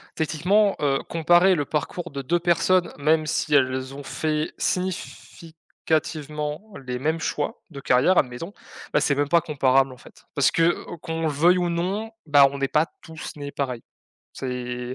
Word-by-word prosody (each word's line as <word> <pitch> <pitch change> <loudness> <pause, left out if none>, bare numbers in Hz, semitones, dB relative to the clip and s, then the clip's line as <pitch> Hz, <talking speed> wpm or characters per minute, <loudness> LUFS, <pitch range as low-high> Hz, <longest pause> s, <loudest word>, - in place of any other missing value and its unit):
techniquement, 185 +7 +2
heu, 140 -2 +1
comparer 175 +3 +4
le 145 -3 -1
parcours 170 +3 -3
de 140 0 -5
2 170 +6 0
personnes, 175 +1 +2
même 155 +2 +2
si 150 0 -1
elles 130 -1 +2
ont 140 0 -8
fait 155 +2 -2
significativement 160 -3 -3 0.2
les 125 0 -3
mêmes 155 +4 0
choix 150 -2 -3
de 140 -5 -9
carrière, 130 +10 +3
admettons, 135 +9 -1 0.4
bah, - - +3
c'est 145 - +2
même 145 0 0
pas 170 +2 +4
comparable 135 -3 +2
en 130 - -12
fait. - - -17
Parce 145 - +3
que, 165 +1 +3
o - - -7
o - - -8
qu'on 165 0 -4
le 160 - +2
veuille 165 +5 +4
ou 175 -1 0
non, 190 +6 -2 0.2
bah, 145 -1 +7
on 140 - -6
n'est 135 0 0
pas 150 +1 +3 0.2
tous 160 -1 -8
nés 145 -1 -7
pareils. 130 -5 -3 0.5
C'est 125 -1 -5
150 Hz, 175 wpm, -24 LUFS, 140-170 Hz, 0.5 s, bah